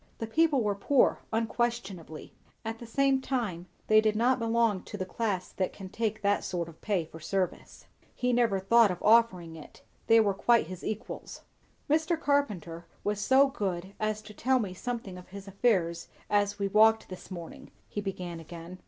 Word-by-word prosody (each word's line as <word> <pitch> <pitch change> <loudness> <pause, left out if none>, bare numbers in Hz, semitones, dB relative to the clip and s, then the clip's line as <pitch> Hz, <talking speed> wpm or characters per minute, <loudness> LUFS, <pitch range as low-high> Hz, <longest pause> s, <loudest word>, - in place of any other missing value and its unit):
The 225 - -3
people 290 +2 +2
were 205 -1 +1
poor 255 +7 +2
unquestionably; 225 -7 -3 0.3
at 225 0 -4
the 235 - -9
same 270 +2 +2
time 210 -11 -3 0.2
they 215 0 +6
did 215 -1 +1
not 245 +4 +2
belong 230 -4 +1
to 205 - -7
the 185 - -3
class 195 -2 -2
that 185 - -2
can 190 -2 -9
take 215 0 -2
that 200 0 +2
sort 175 -3 -3
of 165 -1 -14
pay 195 -6 0
for 160 +1 -12
service. 185 +3 -3 0.3
He 250 0 0
never 230 -5 +2
thought 225 +3 +5
of 180 - -2
offering 200 -7 +4
it. 155 - -13 0.2
They 225 0 +7
were 205 -3 +3
quite 235 +4 +3
his 185 +2 -9
equals. 215 +1 -6 0.5
"Mr. 320 +2 +1
Carpenter 185 - -1 0.2
was 205 0 -1
so 270 +5 +5
good 190 -7 -3
as 215 0 -1
to 210 0 -11
tell 260 +5 +2
me 205 -7 -2
something 210 -3 -5
of 180 - -14
his 200 +1 -10
affairs 190 -5 +1 0.2
as 205 0 +2
we 200 -1 0
walked 220 +2 +4
this 185 -1 -9
morning," 170 -3 -9 0.2
he 205 - -4
began 180 -4 -5
again. 170 +2 -10
210 Hz, 180 wpm, -29 LUFS, 185-235 Hz, 0.5 s, They